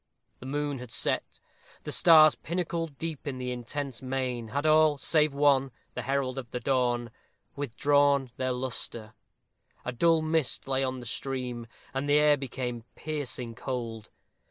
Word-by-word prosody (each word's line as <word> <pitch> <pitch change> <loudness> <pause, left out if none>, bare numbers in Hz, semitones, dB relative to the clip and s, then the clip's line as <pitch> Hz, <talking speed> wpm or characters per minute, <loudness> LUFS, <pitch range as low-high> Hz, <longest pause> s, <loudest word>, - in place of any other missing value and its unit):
The 130 - -9
moon 145 -1 -2
had 125 -2 -9
set. - - -1 0.4
The - - -5
stars, 155 -3 +7
Pinnacled 165 -3 -3
deep 160 -3 -5
in 135 -2 -3
the 125 0 -3
intense 125 +2 -5
main, 130 -3 -2
had 140 +7 -2
all 155 -1 +5
save 155 +1 +2
one, 140 -1 +3 0.2
the - - -3
herald 135 -1 -1
of 120 -3 -8
the 125 - -4
dawn 120 -2 0 0.4
withdrawn 140 0 +2
their 130 0 0
luster. 120 -3 -3 0.7
A 125 - -1
dull 160 +6 +3
mist 155 -5 0
lay 135 0 +1
on 130 -1 -2
the - - -9
stream, 125 -1 -2 0.3
and 135 +2 -2
the 145 - +5
air 150 0 +5
became 125 -3 -4
piercing 140 -6 -4
cold. 115 -3 -5
135 Hz, 155 wpm, -28 LUFS, 125-145 Hz, 0.7 s, stars